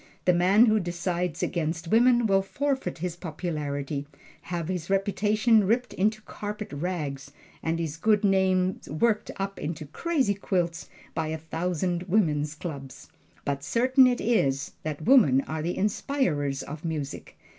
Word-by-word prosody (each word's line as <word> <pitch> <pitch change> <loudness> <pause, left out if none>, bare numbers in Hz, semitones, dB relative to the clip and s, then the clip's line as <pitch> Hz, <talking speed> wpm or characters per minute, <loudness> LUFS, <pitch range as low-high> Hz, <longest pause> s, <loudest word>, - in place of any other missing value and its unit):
The 180 - +5
man 190 +6 +5
who 215 -2 +3
decides 175 -1 -2
against 165 -1 -2
woman 240 +2 +5
will 195 -2 +3
forfeit 265 -2 -2
his 175 +1 -3
popularity, 150 -4 -4 0.3
have 170 -2 -4
his 180 -2 -3
reputation 210 +3 +3
ripped 245 +4 +1
into 215 +3 0
carpet 210 -4 -6
rags, 145 -4 -3 0.3
and 165 0 -1
his 165 -2 -3
good 210 +4 +2
name 190 -1 +2
worked 210 +9 +1
up 195 0 -4
into 155 0 -4
crazy 270 - 0
quilts 175 -4 -2 0.2
by 160 -1 -1
a 160 0 -2
thousand 175 +2 -2
Woman's 155 -7 +1
Clubs. 140 -5 -8 0.4
But 140 0 -2
certain 255 - +4
it 245 -1 +1
is 140 - +1
that 155 0 -5
women 155 - +6
are 155 +2 -4
the 170 +3 -2
inspirers 180 - 0
of 150 +2 -8
music. 155 -4 -5
180 Hz, 145 wpm, -27 LUFS, 155-210 Hz, 0.4 s, women